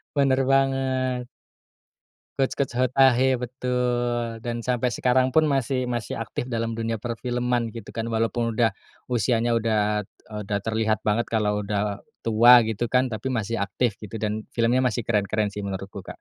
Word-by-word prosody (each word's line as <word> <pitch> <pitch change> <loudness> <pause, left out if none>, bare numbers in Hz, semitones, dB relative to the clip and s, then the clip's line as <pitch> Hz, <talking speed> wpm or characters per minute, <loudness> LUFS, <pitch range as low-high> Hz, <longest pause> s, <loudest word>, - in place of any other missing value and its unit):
Bener 135 -2 +3
banget. 130 -2 +1 1.1
Kuch 135 -1 +1
Kuch 140 - -1
Hota 130 0 +4
Hai, 130 +1 +3
betul 120 -2 -1
Dan 120 0 -2
sampai 125 0 0
sekarang 130 +3 +2
pun 155 -1 +4
masih 130 -2 0
masih 120 -1 -3
aktif 115 - -4
dalam 115 -2 -3
dunia 115 -1 -2
perfilman 120 0 -2
gitu 115 -3 -9
kan, 115 0 -4
walaupun 115 +1 0
udah 115 0 +3 0.4
usianya 120 0 +1
udah, 105 -2 0
eee, 105 +2 -11
udah 100 0 -1
terlihat 110 0 0
banget 110 +2 +1
kalau 105 -2 +1
udah 105 0 -1 0.2
tua 120 +2 +7
gitu 110 +1 -1
kan, 125 0 +3
tapi 130 +4 -3
masih 115 -1 -2
aktif 100 +2 -1
gitu 110 +1 -8
dan 105 0 -2
filmnya 120 +2 +2
masih 120 0 0
keren-keren 105 -1 0
sih 100 0 -6
menurutku, 95 0 -6
Kak. - - -7
115 Hz, 160 wpm, -24 LUFS, 110-125 Hz, 1.1 s, tua